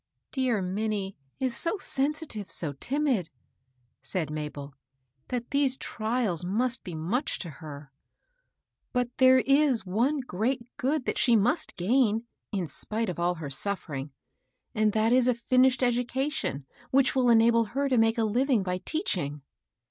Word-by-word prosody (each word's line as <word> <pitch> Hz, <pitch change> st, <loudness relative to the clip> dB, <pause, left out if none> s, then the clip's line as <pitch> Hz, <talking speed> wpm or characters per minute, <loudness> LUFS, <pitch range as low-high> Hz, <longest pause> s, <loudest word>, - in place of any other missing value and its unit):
" -, -, -57 dB
Dear 250 Hz, -7 st, 0 dB
Minnie 200 Hz, +1 st, -2 dB, 0.2 s
is 255 Hz, -2 st, 0 dB
so 340 Hz, +5 st, 0 dB
sensitive, 285 Hz, -, -2 dB
so 150 Hz, -4 st, 0 dB
timid," 255 Hz, -, -1 dB, 0.7 s
said 165 Hz, -6 st, -3 dB
Mabel, 150 Hz, -2 st, -6 dB, 0.3 s
" 130 Hz, +1 st, -47 dB
that 245 Hz, -1 st, -4 dB
these 280 Hz, -2 st, +2 dB
trials 220 Hz, -6 st, -1 dB
must 240 Hz, +7 st, 0 dB
be 175 Hz, -, -7 dB
much 185 Hz, -, -2 dB
to 170 Hz, -, -6 dB
her. 145 Hz, -2 st, -9 dB, 1.0 s
But 250 Hz, -1 st, -1 dB
there 260 Hz, 0 st, +6 dB
is 275 Hz, -5 st, +3 dB
one 245 Hz, +10 st, +1 dB
great 235 Hz, +2 st, -2 dB
good 275 Hz, +1 st, 0 dB
that -, -, -1 dB
she 240 Hz, -3 st, +4 dB
must 245 Hz, -, +1 dB
gain, 225 Hz, +3 st, +2 dB, 0.3 s
in 195 Hz, -5 st, -1 dB
spite 215 Hz, +8 st, -1 dB
of 175 Hz, -, -5 dB
all 175 Hz, +1 st, +1 dB
her 155 Hz, -4 st, -6 dB
suffering, 150 Hz, -5 st, -2 dB, 0.6 s
and 215 Hz, 0 st, +2 dB
that 220 Hz, +2 st, +2 dB
is 255 Hz, -1 st, +4 dB
a 250 Hz, -, +3 dB
finished 255 Hz, +2 st, +3 dB
education 245 Hz, -, -1 dB, 0.2 s
which 270 Hz, 0 st, +3 dB
will 255 Hz, -2 st, +3 dB
enable 230 Hz, 0 st, +5 dB
her 275 Hz, +6 st, -1 dB
tb 255 Hz, -3 st, +2 dB
make 225 Hz, +1 st, +3 dB
a 225 Hz, -, +2 dB
living 240 Hz, +1 st, +2 dB
by 180 Hz, -1 st, -2 dB
teaching." 175 Hz, -, -2 dB
230 Hz, 155 wpm, -28 LUFS, 180-260 Hz, 1.0 s, there